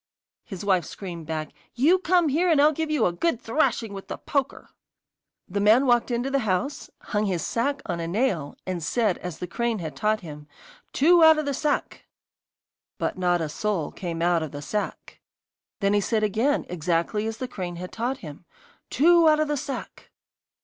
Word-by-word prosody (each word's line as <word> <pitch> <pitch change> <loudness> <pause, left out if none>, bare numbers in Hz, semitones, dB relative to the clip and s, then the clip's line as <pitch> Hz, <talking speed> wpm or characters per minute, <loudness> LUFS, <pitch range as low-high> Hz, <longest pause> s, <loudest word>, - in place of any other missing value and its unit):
His 195 -4 -8
wife 185 -3 +3
screamed 170 -5 -8
back: 155 -2 -4 0.2
'You 315 +10 +4
come 355 -2 +2
here, 340 +6 +2
and 315 -4 +4
I'll 300 +2 +6
give 315 +1 -3
you 300 -7 +2
a 175 - +1
good 245 - 0
thrashing 225 -4 0
with 195 -1 -8
the - - -5
poker!' 280 -1 -3 0.8
The 200 +2 -2
man 220 +6 +5
walked 240 -1 +3
into 245 +2 -1
the 275 - +2
house, 220 +6 -2
hung 210 0 -1
his 180 -4 -1
sack 280 +5 -1
on 175 -3 -3
a 165 - -3
nail, 180 - -1
and 185 -2 -3
said, 205 +4 0
as 180 -3 -6
the - - -5
crane 235 +6 -1
had 160 -5 -6
taught 215 0 0
him: 150 -4 -10 0.4
'Two 335 +4 +5
out 320 -1 +8
of 305 - -1
the 285 - -1
sack!' 295 +2 -2 0.9
But - - -2
not 180 -2 +1
a 160 - -1
soul 180 +1 -2
came 170 -3 -4
out 175 -1 +3
of 155 -3 -4
the 145 - -6
sack. 210 +7 -4 0.6
Then 200 0 +2
he 205 - +3
said 215 +1 0
again, 230 +8 +1
exactly 180 +5 -1
as 225 0 -4
the 255 - -4
crane 180 -6 -5
had 180 +1 -7
taught 245 +4 -3
him: 150 +3 -10 0.4
'Two 335 +3 +5
out 305 0 +4
of 310 - +1
the 295 - 0
sack! 275 0 -6
215 Hz, 195 wpm, -25 LUFS, 175-280 Hz, 0.9 s, out